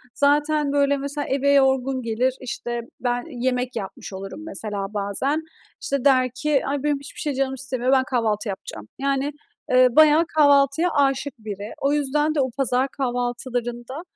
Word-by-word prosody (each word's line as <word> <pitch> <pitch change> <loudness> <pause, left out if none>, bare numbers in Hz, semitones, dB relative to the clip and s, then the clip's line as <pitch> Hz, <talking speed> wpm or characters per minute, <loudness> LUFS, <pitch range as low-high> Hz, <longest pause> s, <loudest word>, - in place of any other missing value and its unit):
Zaten, 295 0 +2
böyle, 285 0 +2
mesela, 285 +1 -4
eve 280 +1 +2
yorgun 265 -1 +3
gelir, 240 +2 0
işte, 240 -1 -4 0.2
ben 245 -1 -1 0.2
yemek 250 -1 0
yapmış 200 -2 -6
olurum 195 +7 -7
mesela 210 -9 -4
bazen. 210 +10 -1 0.4
İşte 280 -1 -2
der 255 -2 +4
ki: 290 +1 +1
"Ay, 280 0 -2
benim 295 -2 +1
hiçbir 280 - -11
şey 300 -4 -2
canım 265 0 -1
istemiyor, 260 -1 -2
ben 265 -1 +4
kahvaltı 225 -4 -1
yapacağım." 110 - -7
Yani, 275 +1 0 0.4
eee, 255 0 +6
bayağı 310 +1 +6
kahvaltıya 285 +3 +4
âşık 275 0 +1
biri. 210 -1 -6
O 280 +1 +2
yüzden 295 +2 +1
de - - +1
o 260 - 0
pazar 260 0 +2
kahvaltılarında 245 0 -3
265 Hz, 155 wpm, -23 LUFS, 245-285 Hz, 0.4 s, eee